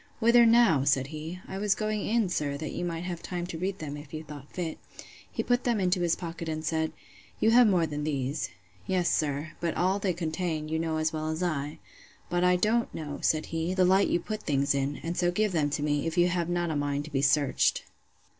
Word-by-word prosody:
Whither 235 0 +6
now? 225 - +5
said 135 -1 +2
he. 155 +4 -7
I 190 - -5
was 205 0 +2
going 215 -1 -2
in, 225 -1 +1
sir, 145 -4 -1
that 155 +1 -5
you 175 - -4
might 170 -1 -3
have 175 -2 -4
time 175 -1 -4
to 175 -2 -6
read 190 +2 -2
them, 150 -5 -5
if 145 +1 -9
you 155 - -5
thought 145 -2 -11
fit. 170 -3 -4 0.5
He - - -2
put 245 0 +1
them 235 -3 +1
into 180 -1 +1
his 170 -1 +2
pocket, 165 -1 -6
and 155 0 -3
said, 160 -1 0 0.5
You 220 - +4
have 240 0 +7
more 180 -5 +3
than 150 -1 -4
these. 140 -1 -2 0.4
Yes, 180 -2 +1
sir: 150 +1 -1
but 170 -1 -1
all 190 +3 +1
they 195 -2 0
contain, 160 -2 -2
you 160 0 -1
know 160 -1 -1
as 155 0 0
well 155 0 -2
as 160 +3 -2
I.—But 160 +2 -4
I 180 0 +5
don't 220 +6 +1
know, 150 -2 -5
said 155 0 +1
he, 165 +3 -1
the 185 -1 +4
light 190 +2 +4
you 175 - +1
put 215 +4 -5
things 140 -1 +1
in; 140 +1 -1
and 170 +1 -3
so 175 0 +2
give 210 +3 +1
them 155 -4 +1
me, 145 0 0
if 165 +2 -3
you 175 +1 +5
have 175 -1 -1
not 175 -1 0
a - - -2
mind 145 0 -1
to 155 - -10
be 135 -2 0
searched. 140 0 +2
165 Hz, 230 wpm, -28 LUFS, 150-185 Hz, 0.5 s, have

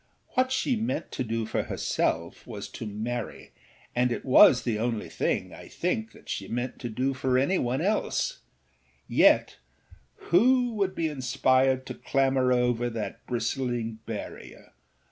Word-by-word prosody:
What 255 0 +1
she 265 0 +1
meant 225 +2 -2
to 130 - -2
do 115 -1 -2
for - - -1
herself 85 +1 -2
was 105 -4 -6
to 115 - -7
marry, 110 +4 -5 0.4
and 125 0 +2
it - - -3
was 130 -1 +7
the 110 -3 -1
only 115 -1 -2
thing, - - -1
I - - -11
think, 220 +6 -2
that - - -18
she 95 - -4
meant 120 +4 -3
to 120 - -4
do 130 +5 -1
for 130 0 +1
any 140 +9 +2
one 125 +4 -1
else; 205 +5 0 0.7
yet - - +4 0.7
who 245 +6 +4
would 195 -3 -1
be 165 - 0
inspired 130 -1 +2
to - - -5
clamber 135 -2 +1
over 120 -1 +2
that 115 -2 -5
bristling 120 -2 -2
barrier? 110 -3 -8
125 Hz, 150 wpm, -27 LUFS, 115-150 Hz, 0.7 s, was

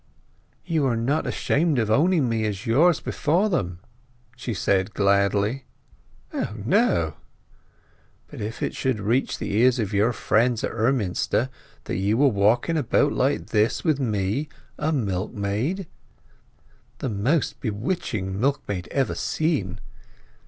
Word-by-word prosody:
"You 160 -5 +1
are 120 - +1
not 135 +7 0
ashamed 155 -1 +1
of 110 -3 +1
owning 155 +2 +3
me 115 -1 0
as 105 +2 -4
yours 155 +9 +4
before 175 +8 +1
them!" 90 - -2 0.5
she 125 -1 -5
said 95 -1 0
gladly. 100 +5 +2 0.7
"O 105 - -3
no!" 115 - +2 1.1
"But - - -9
if 110 +2 -4
it - - -1
should 130 -5 -1
reach 115 +6 0
the 105 -2 -3
ears 125 +2 +4
of 110 -3 -2
your 105 +4 +3
friends 120 0 +1
at - - -1
Emminster 115 0 0 0.3
that - - -3
you 100 +5 +1
are - - +7
walking 115 +9 +2
about 145 +1 +2
like 135 +3 0
this 110 0 +2
with 155 -4 +2
me, 110 +4 -1 0.3
a 150 +1 0
milkmaid—" 110 - -2 1.1
"The 130 - -3
most 120 +9 0
bewitching 105 - -3
milkmaid 105 -9 -1
ever 135 -2 0
seen." 135 - -1
115 Hz, 130 wpm, -24 LUFS, 100-140 Hz, 1.1 s, are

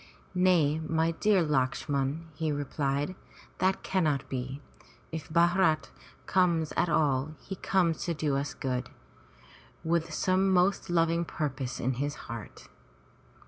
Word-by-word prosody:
Nay, 175 -5 +3
my 160 +1 +1
dear 195 +2 +3
Lakshman,'' 140 +1 0
he 155 +1 -1
replied. 145 +2 -1 0.5
"That 190 +1 +1
cannot 155 -7 0
be. 130 +1 -4 0.5
If 160 -2 -6
Bharat 170 -1 +3 0.3
comes 170 -4 +2
at 175 - +2
all, 150 -1 +1
he 195 - -7
comes 175 -4 +1
to 170 - -1
do 150 -2 0
us 140 +1 -2
good, 125 -2 -2 0.9
with 165 0 0
some 190 +4 +2
most 185 +1 +2
loving 170 0 +2
purpose 135 -6 -3
in 130 +2 0
his 145 0 -1
heart." 115 -3 -9
160 Hz, 125 wpm, -29 LUFS, 140-175 Hz, 0.9 s, Nay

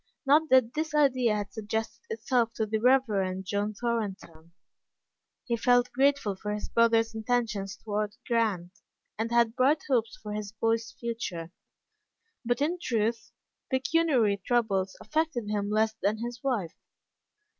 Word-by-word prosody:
Not 300 +3 +4
that 255 -3 +4
this 310 0 -2
idea 255 -6 +3
had 205 -1 -4
suggested 220 +1 -4
itself 245 - 0
to 220 - 0
the 215 +1 -1
Rev. 210 -7 +2
John 205 +2 -2
Thorn 230 -3 -1
ton. 165 -3 -18 0.9
He 235 - 0
felt 245 +1 +3
grateful 270 -5 +2
for 210 +2 -4
his 210 - -6
brother's 230 -1 +3
intentions 220 -3 -1
toward 210 -1 -3
Grant, 210 -7 0 0.5
and 225 +1 -1
had 235 -1 +3
bright 280 +4 +3
hopes 235 -5 0
of 210 - -4
his 210 -1 -5
boy's 225 +1 0
future. 185 -8 -4 0.9
But, 245 +3 0
in 345 +4 -1
truth, 230 -4 -1 0.4
pecuniary 260 -7 +2
troubles 200 -6 0
affected 310 -8 -1
him 205 -1 -1
less 220 +1 +2
than 205 +2 +1
his 240 +2 -6
wife. 225 -12 -1
225 Hz, 140 wpm, -28 LUFS, 210-250 Hz, 0.9 s, Not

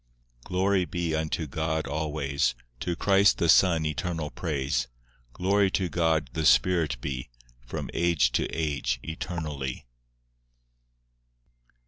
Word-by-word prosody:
V - - -33
Glory 95 0 +1
be 85 -2 -2
unto 80 +1 -1
God 80 +2 -2
always, 70 -3 -1 0.2
To 85 - -2
Christ 100 +2 +4
the 85 - +1
Son 85 -1 +5
eternal 80 0 -2
praise; 65 -6 -1 0.5
Glory 100 +2 +2
to 95 -1 -1
God 80 -7 +1
the 80 - -2
Spirit 80 -4 +3
be, 65 -3 -4 0.4
From - - -4
age 85 -7 +2
to - - 0
age 70 -6 -1
eternally. 80 -6 -5
80 Hz, 115 wpm, -27 LUFS, 70-85 Hz, 0.5 s, Son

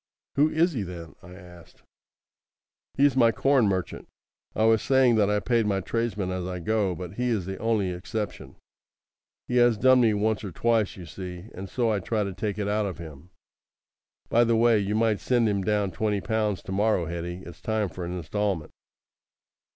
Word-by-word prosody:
"Who 150 +2 +3
is 165 +3 +2
he, 120 - -2
then?" 85 -3 -7
I 90 -1 -13
asked. 90 -3 -15 1.1
"He's 140 -1 +3
my 120 -3 +5
corn 135 -2 +3
merchant. 95 -2 -3 0.5
I 110 - +1
was 110 -1 +4
saying 130 -2 +4
that 105 -2 +3
I 105 0 +2
paid 115 -1 +1
my 100 -2 +1
tradesmen 105 -2 -2
as 90 -1 -3
I 90 -1 -4
go, 100 0 0
but 90 +2 -8
he 125 0 0
is 105 -7 -1
the 95 0 -6
only 110 -4 0
exception. 105 +4 -5 0.9
He 125 - 0
has 120 -2 +4
done 130 +3 +5
me 110 -3 +3
once 110 +1 0
or 100 - -5
twice, 115 +1 0
you 90 - -9
see; 90 +3 -8
and 95 +1 -8
so 120 -3 0
I 105 - 0
try 105 +3 -1
to 100 -1 -4
take 100 +2 -3
it 105 -1 -2
out 105 0 0
of 90 -6 -6
him. 80 0 -11 1.0
By 120 - +4
the 115 -1 +2
way, 115 -1 +4
you 100 +1 -1
might 110 -2 +2
send 120 -3 +2
him 100 -2 0
down 105 -1 0
twenty 105 0 -1
pounds 105 -2 -1
to - - -8
morrow, 100 -2 +1
Hetty. 85 +2 -5
It's 85 - -12
time 110 -2 -1
for 90 0 -7
an 90 +1 -4
instalment." 95 -1 -2
105 Hz, 195 wpm, -26 LUFS, 90-115 Hz, 1.1 s, my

